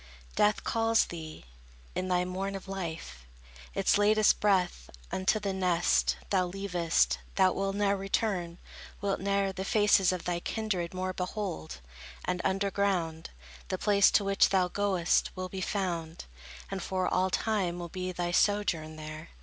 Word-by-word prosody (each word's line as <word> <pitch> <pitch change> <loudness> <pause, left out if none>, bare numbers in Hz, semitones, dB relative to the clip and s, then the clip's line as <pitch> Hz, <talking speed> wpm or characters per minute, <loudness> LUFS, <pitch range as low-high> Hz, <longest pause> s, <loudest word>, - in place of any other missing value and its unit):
Death 210 0 +2
calls 225 0 +2
thee; 160 - -8 0.5
in 185 - -2
thy 180 -1 +1
morn 190 +2 -3
of 195 - -8
life, 160 - -6 0.5
Its - - +3
latest 215 +1 +4
breath. 185 - +1 0.2
Unto 190 +3 +1
the 200 -1 -2
nest 75 - +2
Thou 185 -2 +2
leavest, 180 -3 0 0.2
thou 190 -1 +4
wilt 195 0 -2
ne'er 200 -1 +2
return; 190 -3 -1 0.4
wilt 200 -1 -1
ne'er 200 0 0
The 190 - -4
faces 205 -2 +4
of 185 -2 -3
thy 175 -1 -1
kindred 185 -4 -3
more 185 0 -2
behold; 180 - -4 0.4
And 180 -1 -1
under 195 +1 0
ground, 175 -5 -1 0.4
The - - -2
place 200 -1 +4
to 205 - +4
which 195 0 +3
thou 185 -2 +2
goest 190 -3 +1
will 185 -1 -4
be 190 0 -5
found; 170 -5 -3 0.5
And 195 -1 -3
for 185 +1 -1
all 185 +1 +1
time 190 -4 0
will 175 -1 -6
be 185 +1 -4
thy 175 -1 -2
sojourn 175 -5 +1
there. 155 +1 -8
185 Hz, 155 wpm, -30 LUFS, 175-200 Hz, 0.5 s, latest